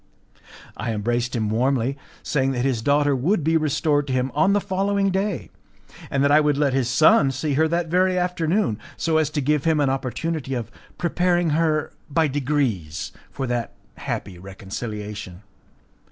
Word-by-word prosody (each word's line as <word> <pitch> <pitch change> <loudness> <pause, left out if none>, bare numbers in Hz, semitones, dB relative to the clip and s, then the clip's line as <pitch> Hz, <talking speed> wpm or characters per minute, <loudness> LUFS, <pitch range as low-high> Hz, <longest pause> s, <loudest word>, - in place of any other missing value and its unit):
I 115 - -3
embraced 120 +3 -1
him 110 -2 -1
warmly, 130 +2 +1 0.3
saying 135 -2 0
that 125 0 -1
his 130 -5 0
daughter 145 +2 +2
would 160 +7 +1
be 160 +2 +2
restored 150 -1 +1
to 130 - -2
him 130 +1 0
on 195 +1 +3
the 205 - +3
following 195 0 0
day, 190 -1 -2 0.6
and 140 0 +1
that 140 - +3
I 150 - +7
would 150 -2 +2
let 145 -2 +2
his 130 -2 +1
son 140 +1 +5
see 140 +3 -2
her 160 +3 +3
that 170 +1 0
very 185 +2 +2
afternoon, 180 - 0 0.2
so 160 -1 +1
as 155 -2 +1
to 150 -1 -2
give 150 +2 +1
him 160 -2 +3
an 140 -2 +2
opportunity 135 +2 -3
of 120 -4 -4 0.3
preparing 175 -1 +1
her 155 -1 +1 0.2
by 160 +2 +2
degrees 130 - -1 0.2
for 135 - -4
that 120 -2 -2 0.2
happy 90 - -5
reconciliation. 105 0 -7
145 Hz, 170 wpm, -23 LUFS, 125-160 Hz, 0.6 s, I